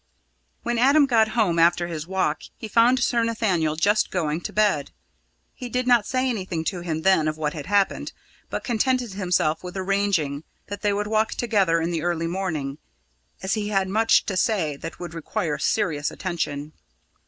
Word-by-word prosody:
When 240 -1 -1
Adam 280 +4 +5
got 230 -5 +3
home 180 -7 +2
after 175 +1 +4
his 160 -2 -5
walk, 185 -5 0 0.2
he 220 - -7
found 235 +4 +4
Sir 235 -1 +2
Nathaniel 195 -9 0
just 205 +7 +2
going 160 -3 -1
to - - -5
bed. 205 -10 +1 0.6
He 250 - -7
did 250 +1 -1
not 240 -4 +4
say 255 +1 0
anything 185 -9 -2
to 180 - -5
him 160 -2 -3
then 190 -5 +4
of 155 0 -2
what 150 -1 -2
had 150 -1 -7
happened, 200 0 +1 0.4
but - - -4
contented 245 -1 0
himself 180 -5 0
with 180 +1 -7
arranging 185 -7 0 0.3
that 205 0 -6
they 205 - +2
would 205 +1 -1
walk 215 +1 0
together 200 -8 +2
in 165 +1 -1
the 165 -2 -1
early 170 0 -1
morning, 160 -6 -3 0.6
as 190 - 0
he 210 -2 -1
had 195 -2 +1
much 220 +3 +3
to 195 - -3
say 185 -6 +1
that 165 +3 -8
would 175 -2 -7
require 165 0 -3
serious 150 -8 0
attention. 155 -4 -4
190 Hz, 180 wpm, -24 LUFS, 160-220 Hz, 0.6 s, Adam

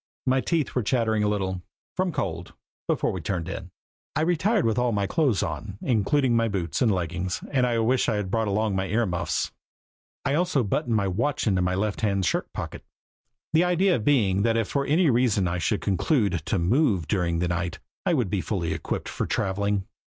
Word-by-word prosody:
My 130 0 +3
teeth 160 -2 0
were 125 - +1
chattering 110 -1 +1
a - - +2
little 95 -3 -1 0.3
from 185 -1 0
cold 85 - -4 0.3
before - - +1
we 95 - -4
turned 85 -3 -2
in. 95 -1 -6 0.5
I 155 - +1
retired 180 +5 +2
with 115 +1 +1
all 120 -1 +2
my 100 -2 0
clothes 125 - +1
on, 95 +6 -5
including 125 +2 +2
my 115 0 +3
boots 95 - -2
and 120 -4 +4
leggings, 90 0 -2
and 130 -3 +2
I 120 -1 +1
wished 120 +3 +2
I - - +1
had 100 -3 -2
brought 110 -1 +1
along 105 0 0
my 95 0 -1
ear 110 +5 +1
muffs. 90 -3 -1 0.7
I 140 - +1
also 160 -4 +2
buttoned 115 +3 0
my 100 -2 +1
watch 120 +10 0
into 95 -4 +2
my 90 +1 +1
lefthand 100 -1 0
shirt - - -1
pocket, - - -6 0.7
the 165 +2 +5
idea 180 -2 +3
being 105 -6 +2
if 115 -2 +2
for 140 -1 -1
any 155 0 +4
reason 115 -6 +2
I 85 +1 -1
should 100 +5 0
conclude 105 - +1 0.2
to 100 - +1
move 95 - +2
during 85 -4 0
the 85 +1 0
night 85 0 -2 0.3
I 180 -3 +2
would 120 -10 0
be 100 - 0
fully 85 -5 -2
equipped - - -4
for - - -3
traveling. 100 0 0
105 Hz, 195 wpm, -26 LUFS, 95-130 Hz, 0.7 s, the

